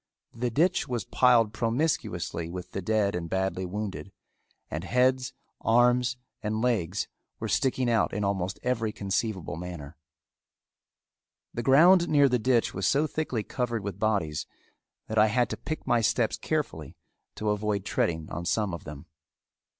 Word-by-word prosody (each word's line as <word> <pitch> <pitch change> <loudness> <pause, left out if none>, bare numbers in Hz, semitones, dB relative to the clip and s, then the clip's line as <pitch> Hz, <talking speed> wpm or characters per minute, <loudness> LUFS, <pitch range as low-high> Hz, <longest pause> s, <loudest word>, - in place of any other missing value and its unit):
The 120 +2 -1
ditch 165 +10 +2
was 120 -6 -2
piled 120 -4 +4
promiscuously 115 - -1
with 90 +1 -7
the 95 - -4
dead 105 0 +1
and 85 -1 -4
badly 95 0 -1
wounded 100 0 -5 0.6
and 80 - -3
heads, 130 +4 +2 0.3
arms, 120 +1 +3 0.2
and 110 +1 -2
legs 105 -6 0 0.3
were - - -3
sticking 130 -1 +1
out 115 -2 +2
in 105 +1 -2
almost 95 -1 -1
every 115 -3 0
conceivable 100 -6 -2
manner. 85 -4 -7 1.6
The 120 - -2
ground 170 +8 +6
near 145 -2 +5
the 125 -2 +1
ditch 120 0 +2
was 95 0 -1
so 140 +7 +3
thickly 150 -8 -2
covered 120 -3 -2
with 100 -1 -5
bodies 100 -9 0 0.6
that 110 0 0
I 110 - +6
had 120 +3 +1
to - - -1
pick 155 +2 -5
my 120 -1 +3
steps 115 +1 +1
carefully 80 - -3 0.4
to 105 -1 -1
avoid 105 -1 -1
treading 80 -2 -1
on 85 - -4
some 100 +1 0
of 85 - -7
them. 75 -1 -9
110 Hz, 150 wpm, -28 LUFS, 95-125 Hz, 1.6 s, ground